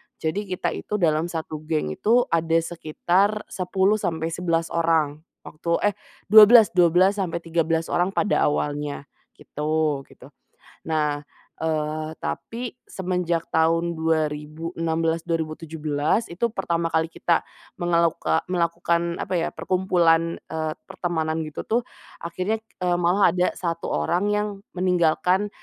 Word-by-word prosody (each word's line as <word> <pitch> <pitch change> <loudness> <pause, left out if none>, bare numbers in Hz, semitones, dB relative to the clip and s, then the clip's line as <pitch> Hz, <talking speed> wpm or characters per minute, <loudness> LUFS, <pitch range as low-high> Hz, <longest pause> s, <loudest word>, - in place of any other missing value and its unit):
Jadi 195 +6 -3
kita 185 -1 -2
itu 210 - -4
dalam 165 -4 +2
1 160 -2 -5
geng 155 - -1
itu 235 - +3
ada 165 0 +1
sekitar 175 +5 0
10 190 +3 +1
sampai 165 -3 -2
11 165 -1 -1
orang 160 -3 +1 0.2
waktu 165 +2 -8 0.2
eh, - - -18 0.4
12- 215 +1 +9
12 185 +3 +4
sampai 170 -2 -2
13 165 -1 0
orang 180 +2 +1
pada 205 - +2
awalnya 145 -1 -2 0.3
gitu 150 -1 -1
gitu. - - -16 0.5
Nah, 150 -2 -1 0.3
eee, 155 0 -2
tapi 240 +1 -5
semenjak 180 -3 -2
tahun 165 +1 +1
2016, 160 +1 -1
2017 155 +2 -1
itu 175 +7 -1
pertama 170 -5 -1
kali 160 0 +1
kita 170 0 +1 0.4
mengeluka 170 -2 +1
melakukan 170 -1 0
apa - - -4
ya 170 -2 0
perkumpulan, 170 -3 +1
eee, 160 -1 -3
pertemanan 160 -2 -2
gitu 155 -1 -6
tuh, 235 +2 +1 0.4
akhirnya, 185 +6 -2 0.2
eee, 175 -1 +2
malah 180 +4 +4
ada 180 0 +2
1 170 -2 -3
orang 175 - 0
yang 210 0 +1 0.3
meninggalkan, 180 +2 +2
165 Hz, 120 wpm, -24 LUFS, 160-180 Hz, 0.5 s, 12